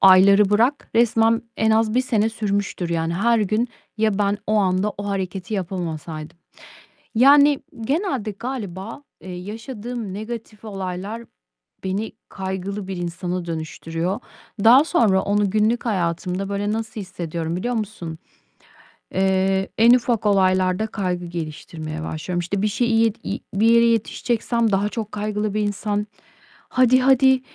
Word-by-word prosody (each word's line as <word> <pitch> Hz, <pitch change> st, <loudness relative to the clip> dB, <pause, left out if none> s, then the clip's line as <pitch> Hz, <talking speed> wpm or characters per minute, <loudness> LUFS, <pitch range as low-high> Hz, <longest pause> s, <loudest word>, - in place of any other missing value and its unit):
ayları 195 Hz, +1 st, +7 dB
bırak, 235 Hz, +7 st, +2 dB
resmen 230 Hz, 0 st, +3 dB
en 220 Hz, 0 st, +2 dB
az 220 Hz, 0 st, +2 dB
1 255 Hz, -, +3 dB
sene 225 Hz, -4 st, +1 dB
sürmüştür, 205 Hz, -5 st, -2 dB
yani, 165 Hz, 0 st, -1 dB
her 235 Hz, +5 st, +3 dB
gün 215 Hz, +4 st, 0 dB, 0.3 s
,ya, 215 Hz, -2 st, +1 dB
ben, 205 Hz, 0 st, +1 dB
o 215 Hz, -, +1 dB
anda 195 Hz, +1 st, +2 dB
o 200 Hz, -, -4 dB
hareketi 195 Hz, +1 st, -3 dB
yapamasaydım. 170 Hz, -4 st, -5 dB, 0.8 s
Yani, 285 Hz, +3 st, +6 dB, 0.2 s
genelde 270 Hz, -, -1 dB
galiba, 220 Hz, +1 st, -6 dB, 0.2 s
eee, 185 Hz, -, -8 dB
yaşadığım 220 Hz, +3 st, -6 dB
negatif 220 Hz, +1 st, -7 dB
olaylar 195 Hz, +3 st, -5 dB, 0.6 s
beni 195 Hz, +4 st, -2 dB, 0.2 s
kaygılı 190 Hz, +1 st, -4 dB
bir 190 Hz, -, -4 dB
insana 175 Hz, 0 st, -3 dB
dönüştürüyor. 165 Hz, +4 st, -3 dB, 0.4 s
Daha 250 Hz, +5 st, +8 dB
sonra 220 Hz, -, +3 dB
onu 205 Hz, 0 st, +1 dB
günlük 215 Hz, +4 st, +1 dB
hayatımda 180 Hz, -1 st, -1 dB
böyle 200 Hz, +1 st, -1 dB
nasıl 220 Hz, -1 st, -4 dB
hissediyorum, 170 Hz, -2 st, -4 dB
biliyor 240 Hz, +7 st, -2 dB
musun? 200 Hz, -7 st, -4 dB, 1.0 s
Eee, 190 Hz, 0 st, +1 dB
en 230 Hz, +2 st, +7 dB
ufak 240 Hz, -3 st, +1 dB
olaylarda 185 Hz, 0 st, +3 dB
kaygı 180 Hz, -5 st, -3 dB
geliştirmeye 155 Hz, -1 st, -6 dB
başlıyorum. 170 Hz, +3 st, -3 dB
İşte 185 Hz, +3 st, -2 dB
bir 210 Hz, -, +2 dB
şeyi 235 Hz, +3 st, 0 dB
iyi 225 Hz, -1 st, +3 dB, 0.2 s
i -, -, -22 dB, 0.2 s
bir 220 Hz, -, +5 dB
yere 235 Hz, 0 st, +6 dB
yetişeceksem 230 Hz, 0 st, +1 dB
daha 200 Hz, +1 st, +1 dB
çok 215 Hz, -1 st, -5 dB
kaygılı 210 Hz, 0 st, -2 dB
bir 215 Hz, -, 0 dB
insan, 205 Hz, 0 st, -1 dB, 0.6 s
"Hadi, 255 Hz, 0 st, +4 dB
hadi, 265 Hz, 0 st, +5 dB
205 Hz, 135 wpm, -22 LUFS, 185-225 Hz, 1.0 s, Daha